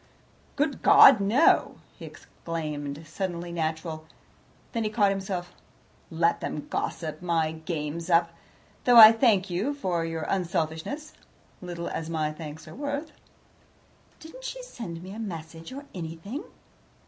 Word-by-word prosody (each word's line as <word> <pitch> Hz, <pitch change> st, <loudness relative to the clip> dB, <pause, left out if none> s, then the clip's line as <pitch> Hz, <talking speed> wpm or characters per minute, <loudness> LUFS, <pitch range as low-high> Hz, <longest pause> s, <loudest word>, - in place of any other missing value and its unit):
"Good 285 Hz, -1 st, -1 dB
God! 265 Hz, -5 st, +8 dB
no!" 230 Hz, +11 st, +3 dB, 0.2 s
he -, -, -8 dB
exclaimed, 150 Hz, -2 st, -6 dB
suddenly 175 Hz, +1 st, -4 dB
natural. 160 Hz, -1 st, -3 dB, 0.6 s
Then 230 Hz, -2 st, -1 dB
he 215 Hz, -, 0 dB
caught 210 Hz, -2 st, +3 dB
himself 190 Hz, -2 st, -4 dB
up. -, -, -27 dB, 0.5 s
"Let 170 Hz, +1 st, +1 dB
them 150 Hz, -, -4 dB
gossip. 155 Hz, -1 st, -3 dB
My 165 Hz, -3 st, 0 dB
game's 160 Hz, +1 st, -5 dB
up, 170 Hz, 0 st, +3 dB, 0.5 s
though 245 Hz, -1 st, +6 dB
I 220 Hz, -1 st, +12 dB
thank 215 Hz, -5 st, +2 dB
you 215 Hz, +12 st, -1 dB
for 180 Hz, -11 st, -1 dB
your 165 Hz, -1 st, -3 dB
unselfishness 180 Hz, -, -2 dB, 0.5 s
little 175 Hz, -1 st, -5 dB
as 160 Hz, 0 st, -4 dB
my 155 Hz, -2 st, -1 dB
thanks 155 Hz, 0 st, -9 dB
are -, -, -10 dB
worth." 285 Hz, +2 st, -4 dB, 1.1 s
"Didn't 410 Hz, +11 st, -12 dB
she -, -, -6 dB
send 185 Hz, -, -8 dB
me 185 Hz, -, -9 dB
a 220 Hz, -, -8 dB
message 165 Hz, -4 st, -7 dB
or 280 Hz, +2 st, -8 dB
anything?" 175 Hz, -, -6 dB
175 Hz, 135 wpm, -27 LUFS, 160-220 Hz, 1.1 s, I